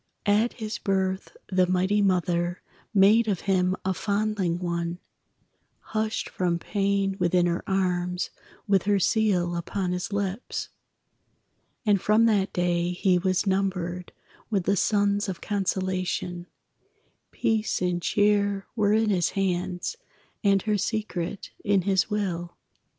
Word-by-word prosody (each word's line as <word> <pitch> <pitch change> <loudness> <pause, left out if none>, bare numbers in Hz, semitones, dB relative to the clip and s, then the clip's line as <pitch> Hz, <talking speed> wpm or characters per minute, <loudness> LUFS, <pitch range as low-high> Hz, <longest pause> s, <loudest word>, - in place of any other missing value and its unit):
At 210 +3 +3
his 215 -4 -5
birth 190 -1 -1
the 185 -1 +3
mighty 185 +3 +2
Mother 175 -2 0 0.3
Made 215 +3 +5
of 195 -5 0
him 185 -1 +1
a 190 - +1
fondling 200 -3 0
one, 170 -1 -2 1.0
Hushed 215 0 -1
from 175 -2 -1
pain 195 +1 0
within 175 0 +3
her 175 0 -1
arms, 180 -2 0 0.4
With 195 -2 +4
her 205 0 +3
seal 185 -3 +2
upon 180 +2 -2
his 180 +2 -3
lips; 200 +2 -3 1.2
And 205 -3 +3
from 215 +2 +4
that 205 -3 +2
day 175 0 0
he 180 0 +2
was 185 +1 +1
numbered 185 -2 -1 0.4
With 200 -5 0
the 195 +3 +2
sons 205 +1 +1
of 180 - -4
consolation, 185 -3 -2 0.8
Peace 220 -1 0
and 180 -1 0
cheer 205 0 +2
were 210 -2 +2
in 220 0 +3
his 175 -4 +2
hands, 180 - -1 0.5
And 195 -2 +3
her 210 -2 +1
secret 200 -4 -3
in 200 -2 +2
his 190 +1 +2
will. 175 -5 -3
190 Hz, 130 wpm, -26 LUFS, 180-205 Hz, 1.2 s, Made